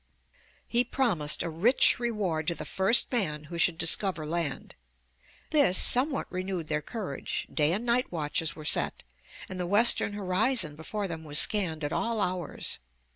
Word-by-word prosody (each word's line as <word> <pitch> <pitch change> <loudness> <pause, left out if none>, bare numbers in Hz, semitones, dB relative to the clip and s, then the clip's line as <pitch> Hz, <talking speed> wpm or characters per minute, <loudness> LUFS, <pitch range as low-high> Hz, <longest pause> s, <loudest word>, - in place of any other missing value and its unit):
He 240 +1 +2
promised 205 - +1
a 170 - -4
rich 215 - +3
reward 200 -10 -3
to 170 - -1
the - - -8
first 195 +5 +2
man 160 - -1
who 170 +3 -9
should 165 0 +2
discover 170 0 +1
land. 165 -2 -4 0.8
This 280 - +4
somewhat 270 +3 +5
renewed 185 -3 -5
their 150 -1 -1
courage; 190 - -6
day 150 0 +2
and 210 +7 -3
night 245 +1 0
watches 160 -1 -2
were 155 -1 -11
set - - +1 0.4
and 185 -1 -8
the 180 - -3
western 205 +1 +3
horizon 190 - 0
before 200 +6 -5
them 160 -2 -7
was 150 -1 0
scanned 170 -7 +2
at 145 +2 -3
.all 230 -1 -2
hours. 180 -4 -3
180 Hz, 160 wpm, -27 LUFS, 160-220 Hz, 0.8 s, somewhat